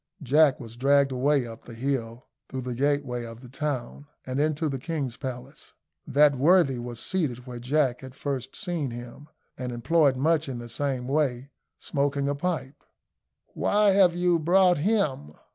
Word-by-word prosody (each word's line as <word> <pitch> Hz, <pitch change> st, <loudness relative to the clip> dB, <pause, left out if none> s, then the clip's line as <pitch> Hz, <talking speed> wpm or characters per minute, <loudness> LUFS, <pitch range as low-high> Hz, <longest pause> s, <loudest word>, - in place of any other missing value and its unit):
Jack 145 Hz, +1 st, +4 dB
was 115 Hz, -3 st, -10 dB
dragged 140 Hz, +1 st, +3 dB
away 135 Hz, +1 st, +2 dB
up 115 Hz, -1 st, -10 dB
the 120 Hz, -, -10 dB
hill, 120 Hz, -2 st, -3 dB, 0.2 s
through 130 Hz, 0 st, -4 dB
the 125 Hz, 0 st, -4 dB
gateway 135 Hz, -2 st, 0 dB
of 115 Hz, 0 st, -9 dB
the 130 Hz, -, -11 dB
town, 140 Hz, 0 st, -4 dB, 0.2 s
and 130 Hz, +2 st, -1 dB
into 155 Hz, +1 st, 0 dB
the 135 Hz, -2 st, -3 dB
king's 140 Hz, -4 st, -3 dB
palace. 130 Hz, +1 st, -8 dB, 0.3 s
That 145 Hz, +1 st, +4 dB
worthy 150 Hz, -4 st, +4 dB
was 120 Hz, -1 st, -6 dB
seated 130 Hz, -10 st, -2 dB
where 125 Hz, -2 st, -7 dB
Jack 130 Hz, 0 st, +1 dB
had 130 Hz, -1 st, -10 dB
first 135 Hz, -2 st, -4 dB
seen 175 Hz, -, -2 dB
him, 120 Hz, +5 st, -9 dB, 0.3 s
and 125 Hz, -1 st, -3 dB
employed 140 Hz, +3 st, +2 dB
much 155 Hz, +1 st, +1 dB
in 130 Hz, -, -4 dB
the 120 Hz, 0 st, -8 dB
same 130 Hz, 0 st, -2 dB
way 135 Hz, -2 st, 0 dB, 0.3 s
smoking 140 Hz, -1 st, -1 dB
a 145 Hz, -, +1 dB
pipe. 145 Hz, -3 st, -4 dB, 0.7 s
"Why 210 Hz, 0 st, +3 dB
have 190 Hz, -3 st, +4 dB
you 175 Hz, -1 st, +2 dB
brought 180 Hz, +1 st, +4 dB
him?" 150 Hz, -, 0 dB
140 Hz, 165 wpm, -26 LUFS, 125-155 Hz, 0.7 s, Jack